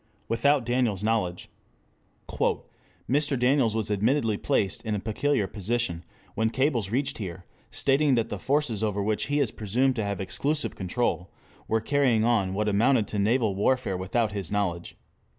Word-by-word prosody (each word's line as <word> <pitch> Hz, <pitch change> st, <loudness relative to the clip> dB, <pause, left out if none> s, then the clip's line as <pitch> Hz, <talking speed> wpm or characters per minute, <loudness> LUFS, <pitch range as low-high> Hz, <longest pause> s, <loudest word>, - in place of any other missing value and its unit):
WITHOUT 135 Hz, +3 st, +2 dB
DANIELS' 120 Hz, -5 st, 0 dB
KNOWLEDGE 105 Hz, -6 st, -1 dB, 1.6 s
"Mr. 145 Hz, +1 st, +1 dB
Daniels 125 Hz, -3 st, +3 dB
was 110 Hz, -1 st, -1 dB
admittedly 110 Hz, +2 st, +1 dB
placed 100 Hz, -1 st, -1 dB
in 110 Hz, -2 st, -1 dB
a -, -, -2 dB
peculiar 110 Hz, +3 st, 0 dB
position 100 Hz, -2 st, -2 dB, 0.3 s
when 110 Hz, +1 st, +1 dB
cables 130 Hz, -5 st, 0 dB
reached 135 Hz, +4 st, -1 dB
here 90 Hz, -3 st, -6 dB, 0.2 s
stating 140 Hz, 0 st, +2 dB
that 115 Hz, -2 st, 0 dB
the 105 Hz, -, -4 dB
forces 135 Hz, -3 st, 0 dB
over 105 Hz, -2 st, 0 dB
which 105 Hz, +1 st, 0 dB
he 145 Hz, +1 st, +1 dB
is 130 Hz, -7 st, +1 dB
presumed 125 Hz, +6 st, 0 dB
to 110 Hz, -, 0 dB
have 100 Hz, -2 st, -3 dB
exclusive 145 Hz, +10 st, -2 dB
control 95 Hz, -1 st, -2 dB, 0.4 s
were 115 Hz, -, +1 dB
carrying 125 Hz, -3 st, +2 dB
on 100 Hz, -6 st, +1 dB
what 105 Hz, +1 st, 0 dB
amounted 105 Hz, +2 st, +3 dB
to 105 Hz, -, -2 dB
naval 110 Hz, +1 st, +2 dB
warfare 105 Hz, 0 st, +1 dB
without 105 Hz, +5 st, 0 dB
his 100 Hz, -4 st, -5 dB
knowledge. 95 Hz, -4 st, -2 dB
110 Hz, 155 wpm, -26 LUFS, 100-130 Hz, 1.6 s, Daniels